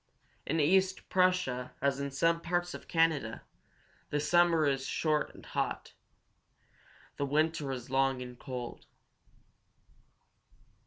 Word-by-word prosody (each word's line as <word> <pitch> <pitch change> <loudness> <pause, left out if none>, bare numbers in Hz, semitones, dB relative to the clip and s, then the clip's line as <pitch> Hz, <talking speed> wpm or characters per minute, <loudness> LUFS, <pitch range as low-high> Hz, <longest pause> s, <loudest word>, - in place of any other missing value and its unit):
In 160 +3 0
East 185 +5 +2
Prussia, 180 -10 +1
as 140 0 +1
in 140 0 -2
some 165 +5 +1
parts 175 +1 -1
of - - -9
Canada, 160 -9 +1 0.7
the 145 - 0
summer 165 +1 +4
is 135 -2 +1
short 155 -2 0
and - - -13
hot; - - -3 1.2
the 140 - 0
winter 150 -1 0
long 135 +1 0
and 125 -1 -8
cold. 125 -3 -7
150 Hz, 110 wpm, -31 LUFS, 135-165 Hz, 1.2 s, summer